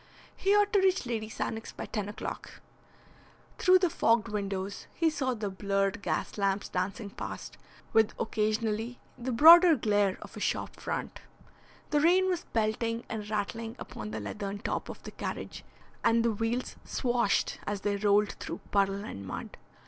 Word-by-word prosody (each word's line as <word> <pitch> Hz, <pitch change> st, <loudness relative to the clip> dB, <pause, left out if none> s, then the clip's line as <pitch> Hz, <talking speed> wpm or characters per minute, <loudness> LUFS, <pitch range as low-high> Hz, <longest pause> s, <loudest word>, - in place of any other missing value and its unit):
He 395 Hz, +1 st, +2 dB
ought 415 Hz, 0 st, +3 dB
to 405 Hz, -, +6 dB
reach 380 Hz, -5 st, +2 dB
Lady 225 Hz, -3 st, -3 dB
Sannox 225 Hz, 0 st, -4 dB
by -, -, -6 dB
ten 205 Hz, -1 st, -3 dB
o'clock. 205 Hz, -, -6 dB, 1.1 s
Through 370 Hz, -1 st, +6 dB
the 365 Hz, -1 st, +2 dB
fogged 230 Hz, -3 st, +2 dB
windows 200 Hz, -1 st, -3 dB
he 330 Hz, -1 st, +2 dB
saw 260 Hz, -4 st, -1 dB
the 210 Hz, -3 st, -3 dB
blurred 195 Hz, 0 st, 0 dB
gas 205 Hz, -, -2 dB
lamps 195 Hz, 0 st, 0 dB
dancing 200 Hz, +3 st, -3 dB
past, 245 Hz, -, -7 dB, 0.3 s
with 225 Hz, -1 st, +4 dB
occasionally 220 Hz, +2 st, -1 dB, 0.2 s
the 250 Hz, +1 st, -4 dB
broader 330 Hz, +7 st, +9 dB
glare 205 Hz, -5 st, +1 dB
of -, -, -12 dB
a -, -, -6 dB
shop -, -, -2 dB
front. -, -, -4 dB, 0.7 s
The 295 Hz, -1 st, +3 dB
rain 365 Hz, +4 st, +5 dB
was 360 Hz, -2 st, -1 dB
pelting 230 Hz, +1 st, -1 dB
and 210 Hz, -2 st, -5 dB
rattling 225 Hz, +2 st, -3 dB
upon 105 Hz, -, -7 dB
the 110 Hz, +1 st, -4 dB
leathern 195 Hz, -, -4 dB
top 200 Hz, -, -3 dB
of -, -, -9 dB
the -, -, -8 dB
carriage -, -, -6 dB, 0.4 s
and 230 Hz, 0 st, +3 dB
the 230 Hz, -, +3 dB
wheels 225 Hz, +4 st, -2 dB
swashed 240 Hz, -5 st, 0 dB
as 205 Hz, -1 st, -2 dB
they 205 Hz, 0 st, 0 dB
rolled 205 Hz, 0 st, +3 dB
through -, -, -6 dB
puddle 200 Hz, 0 st, +1 dB
and 100 Hz, -, -7 dB
mud. 95 Hz, -, -6 dB
220 Hz, 165 wpm, -30 LUFS, 200-245 Hz, 1.1 s, broader